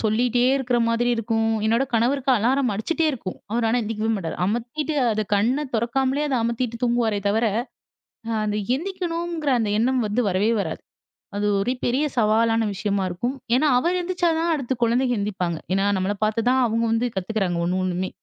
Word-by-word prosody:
சொல்லீட்டே 240 +3 +1
இருக்கற 250 -2 0
மாதிரி 230 +1 +1
இருக்கும். 225 0 0 0.2
என்னோட 230 +5 +2
கணவருக்கு 260 +4 +1
அலாரம் 250 +2 +1
அடிச்சிட்டே 320 +10 0
இருக்கும். 200 -7 -6
அவர் 230 +1 0
ஆனா 230 - +2
எழுந்திரிக்கவே 220 0 -2
மாட்டார். 165 -4 -4
அமத்திட்டு 240 +8 -2 0.2
அது 215 - 0
கண்ண 250 +9 +1
தொறக்காமலே 265 +5 0
அத 270 - 0
அமத்திட்டு 235 0 -2
தூங்குவாரே 235 -3 +1
தவர 225 +3 +2 1.0
அந்த 210 0 -1 0.2
எந்திக்கணுங்கிற 340 -2 -3
அந்த 210 -2 0
எண்ணம் 255 +3 +2
வந்து 210 +4 0
வரவே 195 +4 +1
வராது. 160 -4 -4 0.6
அது 205 +1 0
ஒரு 240 +6 0
பெரிய 260 +5 +1
சவாலான 225 0 +3
விஷயமா 200 -1 -1
இருக்கும். 240 +10 -3 0.2
ஏன்னா, 290 +5 +3
அவர் 345 +8 +1
எந்திரிச்சா 355 0 0
தான் 335 0 +1
அடுத்து 270 -4 -1
குழந்தைங்க 245 +2 +2
எழுந்திப்பாங்க. 185 -5 -2
ஏன்னா, 195 +1 +2
நம்மள 190 +2 0
பார்த்து 215 +1 0
தான் 260 +1 +3
அவங்க 230 +1 0
வந்து 230 +2 +1
கத்துக்கிறாங்க 190 -2 -1
ஒண்ணு 180 +2 0
ஒண்ணுமே, 185 0 -1
230 Hz, 165 wpm, -23 LUFS, 210-260 Hz, 1.0 s, சவாலான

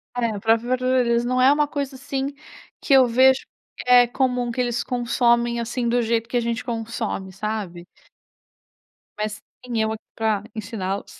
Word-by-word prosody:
É, 245 -1 +1
a 205 - -5
própria 225 +3 +1
verdura 255 0 +2
deles, 235 0 +1
não 255 +1 +1
é 260 +2 +6
uma 295 0 +2
coisa 280 -2 -4
assim, 275 +1 -4 0.5
que 275 - +1
eu 260 -2 +7
vejo 260 +3 +4 0.4
que - - -8
é 245 -1 +7
comum 250 -1 0
que 245 - -6
eles 245 -1 0
consomem, 235 -1 +1
assim, 235 +1 -2
do 245 +1 +2
jeito 230 0 0
que 245 +1 -1
a - - +3
gente 235 0 -2
consome, 225 -4 -4
sabe. 195 -3 -5 1.3
Mais 210 0 -4 0.2
tem 235 -3 -2
eu 220 - 0
aqui 220 - -6
pra 215 -2 0
ensiná-los. 200 -3 -5
235 Hz, 175 wpm, -23 LUFS, 220-255 Hz, 1.3 s, eu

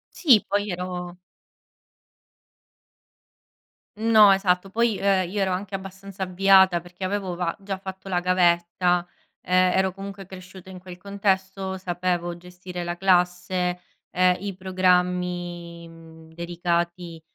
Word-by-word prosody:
Sì 255 - +5
poi 205 0 0
io 205 - -4
ero 180 0 -6 2.8
No 215 -2 +6
esatto. 195 -1 +1
Poi, 230 0 +1
ehm, 190 -3 +1
io 200 +2 -2
ero 190 -1 +1
anche 190 +2 -3
abbastanza 195 0 -7
avviata 190 -1 +4
perché 175 +2 -11
avevo 190 -1 -2
va 170 -1 -2
già 195 -1 -5
fatto 190 0 -9
la 180 -2 0
gavetta. 175 0 +2 0.4
Ehm, 185 0 +3
ero 190 0 +2
comunque 195 0 -8
cresciuta 185 0 -12
in 185 -1 -9
quel 180 -1 -11
contesto, 190 -1 -2
sapevo 175 -1 -2
gestire 180 0 -8
la 175 0 -3
classe, 180 -1 +1 0.3
ehm, 180 0 +3
i 200 0 -5
programmi 180 -2 -1
mhmm, 160 -1 -15
dedicati 170 0 -3
185 Hz, 125 wpm, -24 LUFS, 175-195 Hz, 2.8 s, No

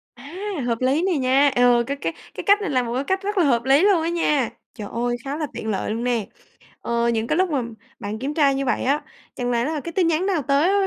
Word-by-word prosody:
À, 285 +8 -11 0.3
hợp 230 +1 -1
lý 270 +5 +2
này 365 -4 +1
nha! 270 +2 +4
Ờ, 245 -1 +4
cái 280 - -3
cái 165 -11 -3 0.2
cái - - -6
cách 405 +1 +5
này 405 - -2
là 255 -3 +1
một 235 -1 -4
cái 265 - 0
cách 380 +5 -1
rất 410 +1 -3
là 360 - +4
hợp 240 -4 +2
lý 275 +4 +5
luôn 395 -5 +4
á 330 - -1
nha. 300 -7 +1 0.2
Trời 210 - -7
ơi, 240 +1 -1
khá 280 +2 -3
là 310 -2 -2
tiện 220 - -6
lợi 205 0 -2
luôn 230 +2 -3
nè! 235 -4 0 0.5
Ờ 235 0 0
những 225 0 -1
cái - - 0
lúc 370 -1 +2
mà 280 -4 +1 0.4
bạn 205 +2 -5
kiểm 275 +4 -3
tra 290 -3 +3
như 275 0 -1
vậy 250 - 0
á, 280 +3 +1 0.3
chẳng 245 -1 -2
lẽ 235 0 +1
là 310 +1 -2
cái 335 +4 -6
tin 350 0 +1
nhắn 330 +2 +1
nào 375 -6 +1
tới 280 +5 +3
á 400 +1 +3
275 Hz, 275 wpm, -22 LUFS, 240-330 Hz, 0.5 s, cách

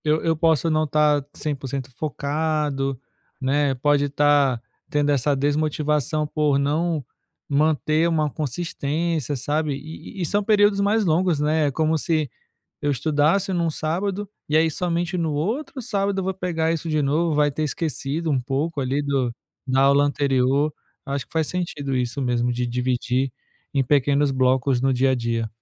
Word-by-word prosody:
Eu 155 0 +1
eu 165 0 +2
posso 165 0 +2
não 155 0 +2
estar 150 -1 +2
100% 135 -3 -4
focado, 145 -1 -2 0.4
né, 140 +1 +1
pode 145 +2 +2
estar 145 -3 +3 0.3
tendo 145 0 +1
essa 140 +1 +2
desmotivação 150 +1 0
por 150 -1 +1
não 150 +1 0 0.4
manter 155 +2 +2
uma 155 -2 +1
consistência, 155 0 -2
sabe, 145 +3 -1
e 155 +7 -9
e - - +1
são 205 +6 0
períodos 205 -1 +4
mais 210 +2 +2
longos, 170 -1 +2
né, 150 +1 +2
é - - 0
como 160 +3 +1
se 155 -3 0 0.5
eu 145 - +1
estudasse 155 - +1
num 170 -2 +1
sábado 190 +6 -2 0.2
e 150 - +2
aí 160 +1 +4
somente 175 +2 -1
no 165 -3 -1
outro 225 - -2
sábado 200 -3 -1
eu - - -4
vou 190 0 -1
pegar 165 -3 -1
isso 165 0 -3
de 155 -1 +1
novo, 155 +3 +1
vai 145 0 +3
ter 150 +2 -3
esquecido 155 +1 -2
um 135 -3 +2
pouco 140 +5 -2
ali 135 +2 0
do 135 -4 0 0.3
da 130 0 +2
aula 140 +1 +5
anterior. 140 +1 +1 0.3
Acho 140 -1 -2
que - - -26
faz 160 -1 +1
sentido 145 -7 -3
isso 125 +2 -2
mesmo 125 -1 0
de 120 0 -1
dividir 125 +2 0 0.4
em 140 - +2
pequenos 140 +1 +2
blocos 130 0 +2
no 135 +1 +2
dia 130 +1 +2
a - - +3
dia. 115 -2 -1
150 Hz, 165 wpm, -23 LUFS, 135-160 Hz, 0.5 s, aula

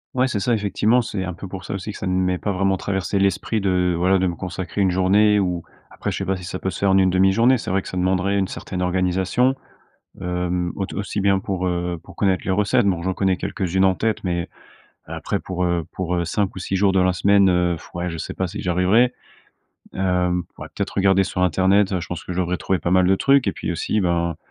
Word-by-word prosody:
Ouais, 130 +1 +2
c'est 105 - -1
ça 120 +4 +1
effectivement, 105 +3 +2
c'est 100 -4 -4
un 90 - -4
peu 95 - -9
pour 95 -1 -8
ça - - -5
aussi 95 +2 -4
que - - -9
ça 95 - -4
ne 90 - 0
m'ait 90 0 +1
pas 100 +1 -2
vraiment 95 0 +1
traversé 95 +1 -2
l'esprit 100 +3 0
de 90 -2 +1
voilà, 95 +2 +3
de 95 - +1
me 85 - -2
consacrer 90 +3 -5
une 95 -2 +3
journée 100 +3 +3
ou 90 -3 -2 0.3
après - - -4
je - - -3
sais - - -3
pas 95 0 -1
si 90 - -9
ça 95 +1 -4
peut 95 - -3
se 85 - -6
faire 100 -1 +2
en 95 - +4
une 95 -1 +4
1/2 95 +1 +3
journée. 125 +4 +4
C'est - - -6
vrai 95 +1 +1
que - - -9
ça 95 - -5
demanderait 95 +2 +1
une 95 - 0
certaine 90 -2 -6
organisation, 95 +8 +1 0.6
hem, 90 0 -2
aut 95 - -2
aussi 100 0 -3
bien 100 -1 +3
pour, 95 -1 -2
heu, 90 -1 -2
pour - - -15
connaître 95 -3 +1
les 95 - -1
recettes. 100 +1 +2
Bon, 90 -4 +1
j'en 95 +1 -1
connais 95 -1 +1
quelques-unes 95 -1 0
en 95 -1 +3
tête, 110 -1 -1
mais 85 -1 -2 0.6
après - - -3
pour, 90 -1 -4
heu, 85 -2 0
pour, 90 -1 -3
heu, 85 - 0
5 95 +3 -1
ou - - -6
6 95 +1 -3
jours 95 0 +3
de 95 - +2
la 90 0 +3
semaine, 100 +2 +4
heu, 90 -1 +2
pff, - - -13
ouais, 90 0 -2
je 80 - -6
sais - - -6
pas 95 - -1
si 105 +4 -6
j'y 90 - -2
arriverai, 95 +8 +3 0.8
hem, 90 -2 0
pourrais - - -9
peut-être - - -4
regarder 95 0 +3
sur 90 0 -2
Internet, 95 +3 +3
heu, 90 - +1
je - - -6
pense 90 -3 -6
que 90 - -6
je 90 - -4
devrais 90 0 -1
trouver 95 +1 -1
pas 85 - -1
mal 95 -1 +4
de 95 - +5
trucs 135 -3 +3
et - - 0
puis - - -4
aussi, 105 - -1
ben, 85 -2 0
95 Hz, 260 wpm, -22 LUFS, 90-100 Hz, 0.8 s, de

